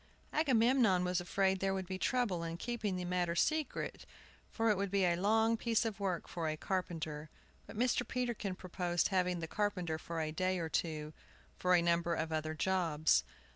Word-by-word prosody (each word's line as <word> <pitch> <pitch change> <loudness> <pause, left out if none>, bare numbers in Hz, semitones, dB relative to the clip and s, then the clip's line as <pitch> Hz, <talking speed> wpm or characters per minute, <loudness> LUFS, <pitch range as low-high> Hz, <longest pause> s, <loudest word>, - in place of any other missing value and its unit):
Agamemnon 240 - +4
was 180 0 0
afraid 190 +1 +1
there 195 0 0
would 190 -1 -3
be 185 +1 -5
trouble 235 -9 +1
in 165 0 -4
keeping 215 -1 -2
the 180 -1 -3
matter 175 -1 0
secret, 310 - -1 0.4
for 225 -1 +1
it - - +2
would 200 0 -1
be 195 -1 +2
a 175 -1 +3
long 220 +5 +3
piece 230 0 +1
of 215 -2 -3
work 185 -4 -2
for 165 -2 -2
a 155 - -3
carpenter; 160 -5 -3 0.4
but - - -10
Mr. 245 0 +1
Peterkin 240 -6 -2
proposed 175 -1 -1
having 180 -2 +1
the 160 - -3
carpenter 180 -5 -1
for 165 +1 -5
a 155 -1 -1
day 185 +3 0
or 165 -2 -3
two, 155 -2 -2 0.4
for 180 0 +3
a 170 - +3
number 170 0 +2
of 160 0 -2
other 155 0 -2
jobs. 160 - +2
185 Hz, 185 wpm, -34 LUFS, 170-210 Hz, 0.4 s, Agamemnon